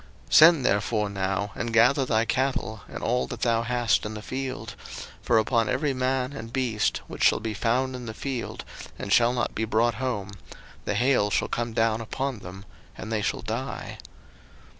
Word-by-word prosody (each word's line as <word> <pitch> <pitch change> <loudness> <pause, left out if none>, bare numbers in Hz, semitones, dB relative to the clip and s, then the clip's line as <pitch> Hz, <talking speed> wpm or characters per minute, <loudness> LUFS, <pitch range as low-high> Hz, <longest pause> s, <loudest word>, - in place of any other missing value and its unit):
02:009:019 - - -5
Send 160 -4 +8
therefore 105 +1 +1
now, 95 +1 -1
and 120 -1 -3
gather 125 +5 +4
thy 115 0 +2
cattle, 125 -3 -1
and - - -7
all 125 +2 +1
that 120 -2 -7
thou 115 -1 +2
hast 120 -1 +1
in 105 0 -5
the 105 - -7
field; 130 +1 -5 0.5
for - - +2
upon 115 +1 +2
every 145 -3 0
man 130 +1 -1
and 115 -4 -7
beast 120 -5 0
which - - -5
shall - - +5
be 110 0 -3
found 130 +5 0
in 125 -2 -7
the 110 - -5
field, 130 -4 -4 0.3
and 100 - -2
shall 120 0 +5
not 125 -1 -1
be 110 - -2
brought 115 +2 +2
home, 105 -6 -2 0.5
the 105 - -1
hail 120 -2 +3
shall - - +1
come 120 -1 -2
down 115 0 +1
upon 130 +2 -3
them, 95 +1 -10 0.3
and 110 - -7
they 110 -2 0
shall - - -2
die. - - -5
115 Hz, 185 wpm, -26 LUFS, 110-130 Hz, 0.5 s, Send